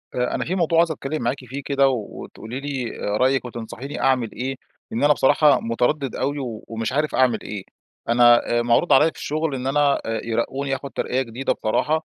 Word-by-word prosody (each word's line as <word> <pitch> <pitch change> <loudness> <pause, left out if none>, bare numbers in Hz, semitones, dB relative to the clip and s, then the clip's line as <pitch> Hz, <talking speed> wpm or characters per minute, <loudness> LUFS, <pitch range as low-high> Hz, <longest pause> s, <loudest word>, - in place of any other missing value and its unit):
آآ 125 0 0
أنا - - -2
في 180 - -2
موضوع 170 -2 +1
عايز 170 -1 +3
أتكلّم 150 -1 -4
معاكِ 120 +3 0
فيه 135 +4 -6
كده، 140 -1 +3
وتقولي 120 +1 -6
لي 135 -4 -4
آآ 105 +1 -1
رأيكِ 130 +2 +2
وتنصحيني 120 +3 -7
أعمل 130 -4 +2
إيه، 130 +2 -4 0.4
لأن 115 - -1
أنا 150 +1 +6
بصراحة، 145 +1 +4
متردد 125 +4 -1
أوي، 140 +2 -1 0.3
ومش 115 +1 -3
عارف 150 +2 0
أعمل 130 -2 +3
إيه. 100 -2 -6 0.5
أنا 120 0 +5
آآ - - +3
معروض 120 +8 +3
عليَّ - - +6
في - - -19
الشغل، 155 -1 -2
إن 130 0 -4
أنا 145 0 +2
آآ 115 -1 -2
يرقوني، 135 +4 -1
آخد 135 +1 -7
ترقية 130 +2 -1
جديدة 125 +1 -2
بصراحة. 155 +8 0
130 Hz, 195 wpm, -22 LUFS, 120-145 Hz, 0.5 s, أنا